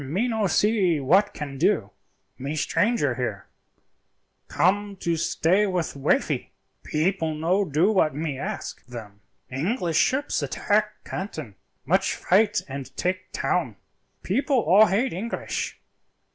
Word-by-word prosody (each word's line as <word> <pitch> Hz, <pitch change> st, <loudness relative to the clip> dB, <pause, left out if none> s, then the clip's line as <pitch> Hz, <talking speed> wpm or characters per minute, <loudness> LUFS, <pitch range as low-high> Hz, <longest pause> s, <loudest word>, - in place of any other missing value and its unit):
"Me 180 Hz, -, -1 dB
no 220 Hz, -4 st, 0 dB
see 190 Hz, -5 st, +2 dB
what 190 Hz, +10 st, +3 dB
can 140 Hz, -3 st, -7 dB
do, 165 Hz, -, +2 dB, 0.5 s
me 140 Hz, +4 st, -3 dB
stranger 155 Hz, -, +1 dB
here; 120 Hz, -5 st, -4 dB, 1.0 s
come 200 Hz, +2 st, +1 dB
to 170 Hz, -3 st, -1 dB
stay 180 Hz, +5 st, +2 dB
with 180 Hz, -6 st, -2 dB
wifey; 140 Hz, -, 0 dB, 0.3 s
people 160 Hz, 0 st, 0 dB
no 175 Hz, +6 st, +1 dB
do 170 Hz, +4 st, +2 dB
what 160 Hz, -9 st, +2 dB
me 150 Hz, -2 st, -2 dB
ask 135 Hz, -, -5 dB
them. 110 Hz, -5 st, -10 dB, 0.3 s
English 170 Hz, -, -1 dB
ships 260 Hz, -, +1 dB
attack 210 Hz, +1 st, 0 dB
Canton, 160 Hz, -, -5 dB, 0.3 s
much -, -, +2 dB
fight 205 Hz, +1 st, +2 dB
and 135 Hz, -1 st, -7 dB
take 185 Hz, +1 st, -2 dB
town, 135 Hz, -, -1 dB, 0.5 s
people 270 Hz, -, +1 dB
all 205 Hz, +5 st, +6 dB
hate 225 Hz, +8 st, +1 dB
English. 215 Hz, +7 st, -4 dB
180 Hz, 125 wpm, -25 LUFS, 145-205 Hz, 1.0 s, all